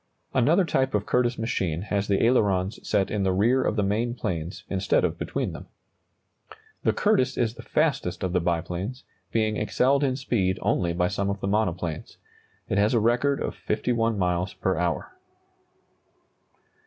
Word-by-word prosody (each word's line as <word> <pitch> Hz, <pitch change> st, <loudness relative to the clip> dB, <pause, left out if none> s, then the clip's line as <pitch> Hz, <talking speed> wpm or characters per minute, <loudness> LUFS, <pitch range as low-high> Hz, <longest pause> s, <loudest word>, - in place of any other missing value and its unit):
Another 160 Hz, +9 st, +4 dB
type 130 Hz, -5 st, 0 dB
of 105 Hz, 0 st, 0 dB
Curtiss 125 Hz, -1 st, +1 dB
machine 95 Hz, -7 st, -1 dB
has 100 Hz, -1 st, -1 dB
the 100 Hz, -1 st, +2 dB
ailerons 100 Hz, -4 st, +2 dB
set 100 Hz, -2 st, 0 dB
in 105 Hz, -, -1 dB
the 95 Hz, -1 st, +2 dB
rear 115 Hz, +8 st, +3 dB
of -, -, 0 dB
the 105 Hz, -, +1 dB
main 115 Hz, +5 st, 0 dB
planes, 85 Hz, -5 st, -4 dB
instead 95 Hz, 0 st, +1 dB
of -, -, -3 dB
between -, -, -2 dB
them. -, -, -9 dB, 1.1 s
The -, -, +2 dB
Curtiss 205 Hz, -12 st, +1 dB
is 115 Hz, -2 st, +1 dB
the -, -, -10 dB
fastest -, -, 0 dB
of 90 Hz, -1 st, -1 dB
the 90 Hz, -, +3 dB
biplanes, 90 Hz, +8 st, -2 dB, 0.3 s
being 110 Hz, -1 st, +1 dB
excelled 135 Hz, +6 st, +2 dB
in 130 Hz, -2 st, +1 dB
speed 105 Hz, -8 st, 0 dB
only 85 Hz, -2 st, +1 dB
by 90 Hz, +1 st, +1 dB
some 100 Hz, 0 st, -1 dB
of 100 Hz, 0 st, -2 dB
the 95 Hz, -, -3 dB
monoplanes. 90 Hz, -6 st, -2 dB, 0.5 s
It 100 Hz, -, 0 dB
has 105 Hz, +4 st, +3 dB
a -, -, +4 dB
record 125 Hz, +5 st, +2 dB
of -, -, -3 dB
51 115 Hz, -3 st, -1 dB
miles 90 Hz, 0 st, 0 dB
per 95 Hz, -, 0 dB
hour. 85 Hz, -, -1 dB
105 Hz, 165 wpm, -26 LUFS, 95-120 Hz, 1.1 s, Another